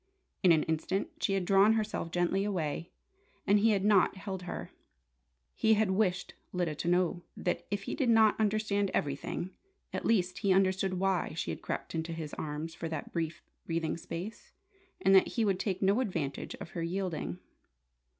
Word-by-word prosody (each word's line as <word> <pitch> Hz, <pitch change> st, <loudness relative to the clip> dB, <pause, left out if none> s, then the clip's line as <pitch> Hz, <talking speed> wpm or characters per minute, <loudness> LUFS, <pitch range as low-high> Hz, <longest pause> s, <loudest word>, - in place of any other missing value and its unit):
In 185 Hz, -, +6 dB
an 160 Hz, -2 st, +5 dB
instant 190 Hz, -, -1 dB
she 195 Hz, -, +1 dB
had 190 Hz, -2 st, 0 dB
drawn 195 Hz, +3 st, +5 dB
herself 215 Hz, -6 st, -1 dB
gently 175 Hz, +3 st, +1 dB
away, 170 Hz, -5 st, -2 dB, 0.6 s
and 205 Hz, +1 st, +5 dB
he 225 Hz, +2 st, +4 dB
had 200 Hz, -2 st, +2 dB
not 205 Hz, -3 st, +4 dB
held 190 Hz, -1 st, -5 dB
her. 180 Hz, -, -6 dB, 0.8 s
He 220 Hz, 0 st, +4 dB
had 210 Hz, -2 st, +2 dB
wished 190 Hz, -2 st, 0 dB, 0.2 s
Lyda 175 Hz, -4 st, -1 dB
to 150 Hz, -, -5 dB
know 175 Hz, 0 st, +2 dB, 0.2 s
that, 175 Hz, -, -2 dB
if 200 Hz, -1 st, -2 dB
he -, -, -4 dB
did 270 Hz, -5 st, +1 dB
not 220 Hz, -2 st, +6 dB
understand 210 Hz, -2 st, +1 dB
everything, 145 Hz, +5 st, -2 dB, 0.4 s
at -, -, -2 dB
least 185 Hz, -5 st, +1 dB
he 200 Hz, -, +2 dB
understood 190 Hz, 0 st, +2 dB
why 190 Hz, -2 st, 0 dB
she -, -, -2 dB
had -, -, -6 dB
crept -, -, -4 dB
into 165 Hz, 0 st, -2 dB
his 160 Hz, -2 st, -6 dB
arms 155 Hz, +2 st, -4 dB
for 165 Hz, 0 st, -5 dB
that 155 Hz, -3 st, -5 dB
brief 165 Hz, -1 st, -3 dB, 0.2 s
breathing 165 Hz, -1 st, -1 dB
space, 175 Hz, +5 st, -7 dB, 0.5 s
and 195 Hz, -, +4 dB
that 190 Hz, -, +7 dB
he 225 Hz, -, +3 dB
would 195 Hz, -3 st, +1 dB
take 190 Hz, -1 st, -1 dB
no 200 Hz, +5 st, +4 dB
advantage 165 Hz, -, -2 dB
of -, -, -9 dB
her 170 Hz, -, -4 dB
yielding. 170 Hz, -, -2 dB
185 Hz, 180 wpm, -31 LUFS, 165-200 Hz, 0.8 s, that